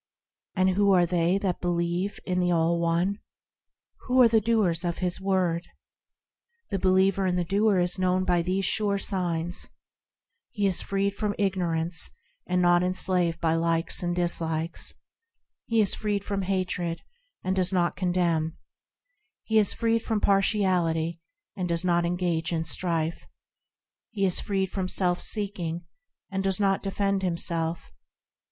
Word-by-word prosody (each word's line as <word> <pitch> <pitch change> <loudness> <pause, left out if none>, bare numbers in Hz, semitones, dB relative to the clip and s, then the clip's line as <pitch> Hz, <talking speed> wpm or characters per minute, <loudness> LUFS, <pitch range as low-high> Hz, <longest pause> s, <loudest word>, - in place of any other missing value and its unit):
And 185 -1 +3
who 200 +1 +3
are 180 -2 +5
they 175 +1 +1
that 195 -3 -2
believe 175 +2 -1
in 180 -1 0
the 180 0 +1
All 170 0 +2
One? 170 +4 0 0.9
Who 255 0 +3
are - - +8
the 225 -1 +3
doers 200 -6 +1
of 170 -1 -2
His 180 0 -2
Word? 180 -3 0 1.0
The 195 - -1
believer 190 +1 +3
and 180 -1 0
doer 200 +1 +2
is 180 +1 0
known 185 0 +2
by 175 -2 +2
these 185 +3 -1
sure 205 0 +1
signs,– 175 -3 -2 0.8
He 205 - -2
is 190 -2 +2
freed 200 0 -1
from 205 0 -2
ignorance 175 -4 0 0.4
and 180 0 +1
is - - +2
not 175 0 +5
enslaved 180 -2 0
by 160 -1 +1
likes 165 0 0
and 175 -1 -1
dislikes; 165 -2 -2 0.7
He 230 -1 +3
is 200 - +3
freed 205 -2 -2
from 200 -1 -2
hatred, 180 -3 -2 0.4
and 185 +1 0
does 185 -1 +1
not 175 -2 +1
condemn; 170 -3 0 0.9
He 220 -1 +3
is 205 - +3
freed 230 0 +1
from 220 -1 -1
partiality, 180 -5 +1 0.3
and 180 -3 -3
does 170 +1 +1
not 175 -1 +2
engage 175 -2 -1
in 165 -1 -1
strife; 165 -1 -2 0.8
He 200 -4 -1
is 185 - +2
freed 190 -2 -1
from 190 -2 -2
self 180 -1 +1
seeking, 180 -5 -1 0.5
and 195 0 -2
does 195 0 0
not 195 -1 +2
defend 195 0 -1
himself. 170 - -3
180 Hz, 150 wpm, -26 LUFS, 170-195 Hz, 1.0 s, are